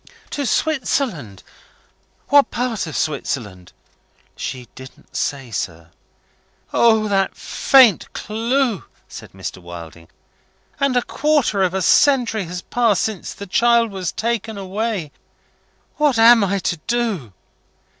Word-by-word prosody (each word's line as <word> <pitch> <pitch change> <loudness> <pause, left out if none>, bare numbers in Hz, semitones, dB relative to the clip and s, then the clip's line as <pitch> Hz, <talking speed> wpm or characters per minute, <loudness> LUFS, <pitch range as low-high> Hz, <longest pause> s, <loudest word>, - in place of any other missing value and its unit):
'" - - -29
"To 285 -3 -2
Switzerland? 235 - -1 0.9
What 285 -1 +5
part 240 -6 -2
of 160 - -5
Switzerland?" 110 - -3 0.6
"She 125 -2 -6
didn't 130 0 -14
say, 135 -4 -3
sir." 85 -5 -5 0.8
"Only 220 -2 +4
that 195 -1 0
faint 255 -9 +4
clue!" 230 0 -1 0.2
said - - -11
Mr. 95 -1 -7
Wilding. 85 -1 -11 0.7
"And 275 -3 +1
a 245 - +2
quarter 290 -10 +1
of 185 0 +1
a 190 - 0
century 240 -7 +3
has 180 +1 -6
passed 230 -5 +1
since 215 -5 -4
the 200 - -8
child 235 +3 +3
was 185 -3 -3
taken 225 -2 -3
away! 195 -4 -3 0.9
What 295 -5 +2
am 230 -1 +7
I 200 0 0
to 175 -2 -2
do?" 225 - -1
205 Hz, 125 wpm, -20 LUFS, 150-240 Hz, 0.9 s, am